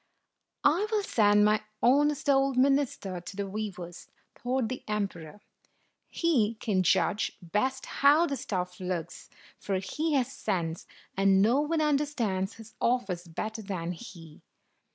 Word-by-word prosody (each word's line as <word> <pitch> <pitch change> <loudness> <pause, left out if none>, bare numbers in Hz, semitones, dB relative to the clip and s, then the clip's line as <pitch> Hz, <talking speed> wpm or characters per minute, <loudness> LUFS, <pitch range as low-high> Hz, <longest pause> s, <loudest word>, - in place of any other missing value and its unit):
"I 345 +9 +3
will 425 -2 +1
send 210 - +4
my 215 0 +3 0.2
honest 290 +4 +3
old 270 -1 +3
minister 260 -9 +1
to 180 +2 -9
the 200 0 -2
weavers," 190 -4 -6 0.3
thought 250 -1 -1
the 255 +3 -5
emperor. 200 -4 -4 0.4
" - - -45
He 235 -10 +3
can 205 -3 0
judge 200 +3 +1
best 235 +9 -1
how 290 +4 +4
the 280 - -2
stuff 180 -7 -4
looks, 180 -2 -5 0.3
for 195 - -2
he 300 +12 -2
has 260 -1 +1
sense, 165 -3 -3 0.3
and 195 0 +4
no 230 +7 +4
one 310 +1 0
understands 275 -10 0
his 225 -1 -13
office 195 -8 0
better 215 +7 -5
than 185 -4 -4
he." 165 -5 -11
215 Hz, 140 wpm, -29 LUFS, 185-270 Hz, 0.4 s, send